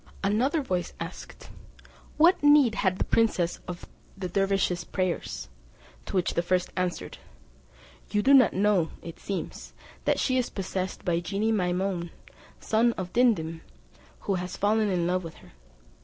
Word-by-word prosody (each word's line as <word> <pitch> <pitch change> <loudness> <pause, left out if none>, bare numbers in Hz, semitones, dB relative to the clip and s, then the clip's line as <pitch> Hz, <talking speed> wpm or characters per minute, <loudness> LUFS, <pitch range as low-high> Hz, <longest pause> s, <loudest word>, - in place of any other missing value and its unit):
Another 255 +10 +1
voice 180 -8 -2
asked, - - -8 0.7
"What 340 +4 +5
need 290 -5 +6
had 190 -3 0
the - - 0
princess 185 -7 +1
of 175 -1 -7 0.3
the 190 -1 -3
dervise's 195 -2 +1
prayers?" 175 - -3 0.6
To - - -5
which 180 -2 +1
the - - +1
first 180 +1 0
answered, 180 -1 -3 0.9
"You 210 -1 0
do 275 - +5
not 260 -4 +7
know, 195 -4 +2
it 165 - -9
seems, 195 -2 -5 0.3
that - - +2
she 255 -1 +2
is 245 - -1
possessed 190 -1 -4
by 170 -1 +1
genie 200 +6 -1
Maimoun, 180 -2 -1 0.5
the - - -17
son 230 +2 +3
of 185 -3 -6
Dimdim, 165 -10 +2 0.6
who 200 - -1
is 180 0 -5
fallen 210 +1 +2
in 180 -3 0
love 180 +1 0
with 165 -1 -8
her. - - -17
190 Hz, 155 wpm, -27 LUFS, 175-220 Hz, 0.9 s, not